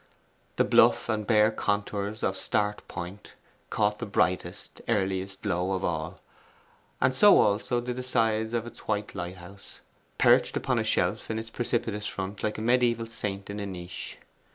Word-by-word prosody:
The - - +3
bluff - - +4
and 105 -2 -1
bare 110 -1 +5
contours 105 0 -2
of 95 - +1
Start 105 +1 -1
Point 90 +4 -8 0.4
caught 105 0 +1
the 120 - -4
brightest, 90 -2 -1
earliest 95 -2 -1
glow 95 -2 0
of 95 - -2
all, - - -3 0.8
and 130 0 +3
so 205 +10 +7
also 105 +4 +2
did 125 +1 -4
the - - -2
sides 115 -2 +1
of 115 -1 -1
its 120 - -12
white 105 -1 -1
lighthouse, 90 +2 -8 0.4
perched - - +4
upon - - 0
a - - +1
shelf - - 0
in 110 - -2
its 110 0 -6
precipitous 115 -3 -2
front 95 +1 -5
like 110 - -1
a - - -4
mediaeval 120 0 +2
saint 105 -4 -5
in 105 - -5
a 100 - -3
niche. 90 -2 -7
105 Hz, 165 wpm, -28 LUFS, 95-115 Hz, 0.8 s, so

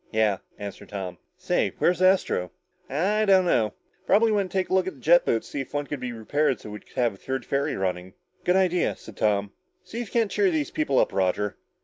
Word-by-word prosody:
"Yeah," 110 -3 +2 0.2
answered 100 -1 -8
Tom. 95 -3 -5 0.2
"Say, 180 -1 0
where's 180 +1 +2
Astro?" 185 - +3 0.4
"I 195 +10 +1
don't 190 -2 +5
know. 110 - +1 0.3
Probably 220 +3 +4
went 200 -3 0
to 195 - -2
take 185 - 0
a - - -2
look 190 -1 +3
at 190 - -4
the - - -17
jet 170 +7 +5
boats 115 - +1
to - - -13
see 140 - -2
if 135 - -8
one 145 0 0
could 145 -1 -5
be 125 -1 -4
repaired 130 +4 0
so 105 - -9
we'd 105 - -9
have 120 -3 +2
a - - -14
third 130 +3 -4
ferry 140 +2 0
running." 90 -1 -3 0.3
"Good 180 - +2
idea," 180 -2 +2
said - - -13
Tom. 100 -1 +1 0.3
"See 215 +6 -6
if 240 - -5
you - - -16
can't 220 -3 +1
cheer 400 -2 +3
these 315 -4 -1
people 315 0 0
up, - - +3
Roger. 95 +2 0
145 Hz, 235 wpm, -26 LUFS, -, 0.4 s, don't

